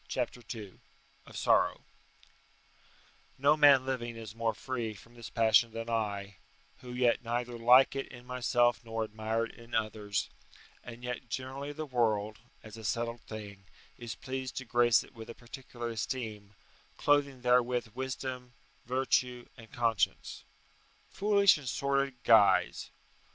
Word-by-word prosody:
CHAPTER 120 - -3 0.2
II 100 -4 -10 0.5
OF - - -10
SORROW - - +2 1.6
No 140 +3 +4
man 140 -4 +6
living 120 -3 -3
is 110 -2 -8
more 115 -1 -1
free 115 -3 -4
from 115 +4 -16
this 120 -1 -9
passion 115 0 +4
than 115 +1 -5
I, 100 -3 -2 0.4
who 125 -2 -10
yet 125 -1 +2
neither 120 +1 -2
like 125 +4 +6
it 135 - -3
in 125 -1 -13
myself 120 -1 +1
nor 115 -1 -3
admire 110 +1 -2
it - - -11
in 115 0 -9
others, 110 -2 -2 0.5
and 120 0 -10
yet 125 -1 -5
generally 135 +4 -5
the 155 +1 -5
world, 110 -5 0 0.2
as 110 0 -11
a 110 - -10
settled 115 +3 -2
thing, 100 -3 -9 0.3
is 120 -2 -6
pleased 130 0 -5
to 130 - -4
grace 120 -1 +4
it - - -18
with 115 -2 -10
a 115 - -8
particular 120 -1 -8
esteem, 110 -3 -5 0.4
clothing 140 -3 +2
therewith 125 -1 +2
wisdom, 130 -1 -5 0.3
virtue, 125 -1 0
and 115 -2 -14
conscience. 125 +4 -1 0.7
Foolish 200 -4 +4
and 135 -4 -5
sordid 140 0 0
guise! 110 -3 +4
120 Hz, 140 wpm, -31 LUFS, 115-130 Hz, 1.6 s, man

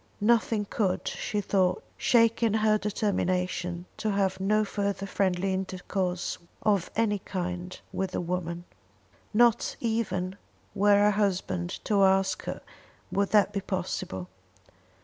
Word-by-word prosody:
Nothing 220 -1 +2
could, 195 -4 -1
she 210 - -2
thought, 185 -2 +1
shake 230 -1 +3
her 230 - +3
in 215 - 0
her 215 -1 +3
determination 185 -4 -1
to 220 - -1
have 195 -2 +1
no 215 +3 +2
further 200 -1 -2
friendly 190 -1 0
intercourse 185 -1 -2 0.2
of 200 -5 +2
any 210 -2 +1
kind 180 -1 -4
with 190 0 -1
the - - -1
woman. 175 -1 -3 0.7
Not 235 +1 +3
even 200 -5 -1 0.4
were 205 +1 +4
her 205 +1 +5
husband 185 -3 0
to 200 -2 +3
ask 190 0 +2
her - - -4 0.5
would 200 0 +1
that 210 -1 +4
be 200 - -1
possible. 175 - -3
195 Hz, 130 wpm, -28 LUFS, 185-210 Hz, 0.7 s, her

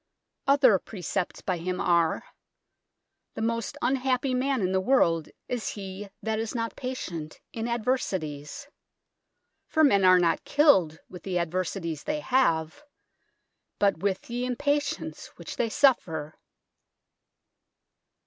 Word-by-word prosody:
Other 270 -8 +5
precepts 185 -2 -4
by 185 -2 -1
him 180 +2 -3
are: 170 -2 +2 0.6
" - - -56
The 220 - -3
most 230 -1 -2
unhappy 260 0 +1
man 260 -1 +1
in 185 - +1
the 190 0 +2
world 170 - +2 0.2
is 245 -3 -2
he 195 0 -7
that 220 0 -1
is 225 +2 -3
not 230 -1 -2
pacient 175 -12 -5
in 225 0 -3
adversities. 210 - -2 1.0
For 315 - +2
men 200 -10 +5
are 185 0 +7
not 170 -2 +2
killed 190 - +4
with 180 - -10
the 185 -2 -2
adversities 170 -2 -2
they 300 0 -1
have; 170 - +1 1.0
but 200 -5 +2
with 195 +1 -1
ye 240 +1 -3
impacience 285 +4 -1
which - - -8
they 230 - +1
suffer." 165 - +2
205 Hz, 125 wpm, -27 LUFS, 175-255 Hz, 1.0 s, are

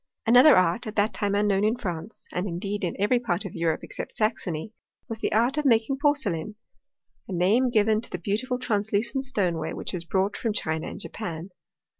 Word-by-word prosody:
Another 250 +4 +7
art, 185 +7 +2
at 215 - -6
that 210 +1 +2
time 200 -1 0
unknown 205 -1 +2
in 215 +2 +2
France, 180 0 -6
and 180 +3 -2
indeed 195 +3 -3
in 175 - -2
every 225 +5 +3
part 205 -4 -1
of 195 - -6
Europe 165 -2 -1
except - - -7
Saxony, 215 -3 -2 0.3
was 225 -1 -5
the - - -1
art 240 +7 +2
of - - -1
making 245 +2 +3
porcelain, 215 - 0 0.7
a - - -8
name 205 +9 +3
given 215 -2 +3
to - - -10
the - - -4
l)eautiful 225 +8 -2
translucent 220 +5 0
stoneware 175 -10 -1
which - - -5
is 175 -2 -3
brought 190 +4 0
from 225 -3 -1
China 160 -5 -2
and - - -7
Japan. 180 -4 -6
205 Hz, 190 wpm, -26 LUFS, 180-230 Hz, 0.7 s, Another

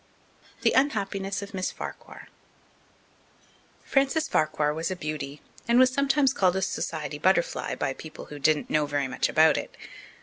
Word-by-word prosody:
The - - +4
Unhappiness 200 -7 0
of 200 +1 -10
Miss 185 -1 -1
Farquhar - - -9 1.6
Frances 275 +4 +1
Farquhar 155 -1 +1
was 160 +2 -2
a 185 - -2
beauty 150 -3 -5 0.2
and 235 +1 +4
was 255 0 +5
sometimes 280 0 +2
called 185 -5 +2
a 190 - 0
society 150 -5 -3
butterfly 185 +1 +1
by 135 - -2
people 155 +3 -10
who 145 - -9
didn't 150 +1 +1
know 150 -1 +2
very 145 -1 -1
much 125 - -1
about 160 0 +5
it. - - -6
180 Hz, 155 wpm, -26 LUFS, 150-225 Hz, 1.6 s, was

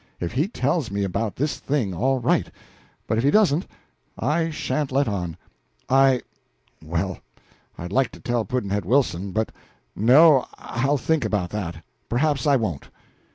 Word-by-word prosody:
If 85 - -3
he 145 - +1
tells 150 - -1
me 100 0 -2
about 100 +3 -2
this 145 +3 -2
thing, 130 -9 -1
all 130 +9 +1
right; 120 - +1 0.6
but 110 - 0
if - - 0
he 140 - +4
doesn't, 185 -4 +3 0.5
I 160 +6 0
sha'n't 150 -2 -2
let 140 +2 +2
on. 90 -6 -3 0.5
I 135 -1 +4 0.6
well, 85 +4 -2 0.6
I'd 90 +1 -6
like 130 +3 +2
to - - -11
tell 120 -2 -1
Pudd'nhead 105 -3 -2
Wilson, 100 -4 +1
but 110 +3 -1 0.4
no, 135 +5 +6
I'll 135 +5 -1
think 160 +3 0
about 90 -5 -1
that; 85 -6 -5 0.3
perhaps 140 +2 +1
I 140 - +5
won't." 100 - -2
120 Hz, 155 wpm, -23 LUFS, 100-140 Hz, 0.6 s, no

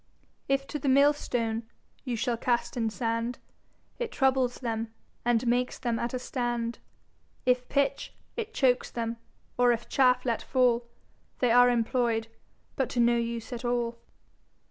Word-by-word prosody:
If 275 0 +1
to 295 - -3
the 275 - 0
Mill 280 +2 +6
stone 230 -5 -2 0.3
you 250 -3 -2
shall 235 +1 0
cast 240 +1 0
in 225 -2 0
Sand, 230 +1 -2 0.6
It 485 - -2
troubles 260 -2 +2
them, 225 -2 -3 0.3
and 240 0 +2
makes 245 +1 +1
them 235 -3 -1
at 240 +2 -2
a - - +1
stand; 240 -2 -2 0.7
If 250 0 +2
Pitch, 280 -1 0 0.2
it 455 -2 -4
chokes 260 - +2
them; 230 -1 -3 0.4
or 245 0 +6
if 235 0 -2
Chaffe 250 -2 +3
let 235 -3 0
fall, 245 -2 +2 0.5
They 250 -2 +2
are 245 +1 +7
employ'd, 230 -1 +1 0.5
but 265 - 0
to 245 - -2
no 235 0 +5
use 235 0 -3
at 240 - -5
all. 240 -1 -1
245 Hz, 155 wpm, -28 LUFS, 230-255 Hz, 0.7 s, are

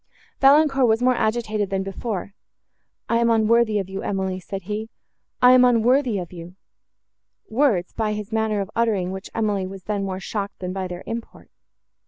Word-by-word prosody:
Valancourt 275 -2 +5
was 225 +2 +2
more 255 0 +4
agitated 220 -3 -1
than 195 -1 -1
before. 195 0 -5 0.7
"I 230 - +2
am 235 0 +2
unworthy 225 -1 +3
of 195 -2 -2
you, 195 0 -5
Emily," 190 -1 -2
said 195 +1 -7
he, 210 +3 -4 0.5
"I 250 - +9
am 255 0 +7
unworthy 245 0 +3
of 180 -1 -6
you;"—words, 180 +5 -4
by 215 -1 -1
his 210 +1 -6
manner 220 -2 0
of 195 +1 -6
uttering 210 -6 +1
which 190 +1 -7
Emily 205 -4 0
was 190 -1 -9
then 205 -1 -2
more 190 -1 -3
shocked 200 +1 -4
than 180 0 -5
by 190 -1 -3
their 180 0 -7
import. 230 0 -7
210 Hz, 170 wpm, -23 LUFS, 190-230 Hz, 0.7 s, I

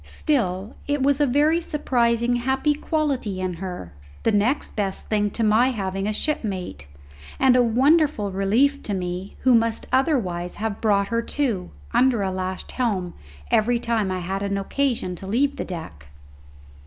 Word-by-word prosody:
Still, 205 - -1
it 290 -2 0
was 280 +1 +2
a 290 - +4
very 300 +6 +3
surprising 240 -6 +1
happy 265 +4 +1
quality 285 - -1
in 185 -1 -2
her, 180 - -6 0.3
the 225 - +3
next 220 +7 0
best 195 -3 -3
thing 210 -1 +1
to 230 - -2
my 220 +4 +4
having 195 -4 -2
a - - +1
shipmate, 195 - -3 0.5
and 260 -2 +5
a 250 - +5
wonderful 260 -1 +3
relief 230 +10 +2
to 205 - -3
me 180 +1 -4
who 255 - +4
must 230 -1 +2
otherwise 200 - 0
have 215 -1 -4
brought 200 -2 +2
her 230 0 +1
to, 235 -7 -1 0.2
under 250 -5 +3
a 190 - -1
lashed 185 0 -4
helm, 195 -9 -1 0.4
every 235 +3 +3
time 230 -4 0
I 185 -1 -2
had 190 +3 -3
occasion 200 +2 -1
to 190 - -9
leave 270 +7 +1
the - - -3
deck. 160 - -8
220 Hz, 160 wpm, -23 LUFS, 190-265 Hz, 0.5 s, and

